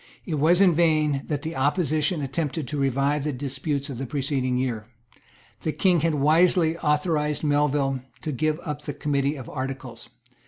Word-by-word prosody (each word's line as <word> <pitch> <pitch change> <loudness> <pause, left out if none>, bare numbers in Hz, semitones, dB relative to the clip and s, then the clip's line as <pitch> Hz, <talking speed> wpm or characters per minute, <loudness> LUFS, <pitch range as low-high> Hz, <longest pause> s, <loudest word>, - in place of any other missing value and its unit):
It 155 -5 -2
was 170 +5 +4
in 185 -3 +6
vain 155 -4 +2
that 145 -1 -2
the 160 +1 -4
opposition 150 +2 +1
attempted 140 +1 -2
to 150 - -3
revive 140 +2 +1
the 150 - -1
disputes 140 +2 -3
of 135 -5 -6
the 135 - -4
preceding 135 -2 -1
year. 120 -4 -2 0.7
The 155 - -1
King 180 -3 +3
had 160 0 +1
wisely 160 +3 +3
authorised 150 -1 0
Melville 145 -2 +1 0.2
to 155 - -2
give 155 +3 0
up 150 -2 -4
the 145 -2 -6
Committee 140 0 0
of 130 -4 -8
Articles. 130 -4 -6
145 Hz, 165 wpm, -25 LUFS, 135-155 Hz, 0.7 s, in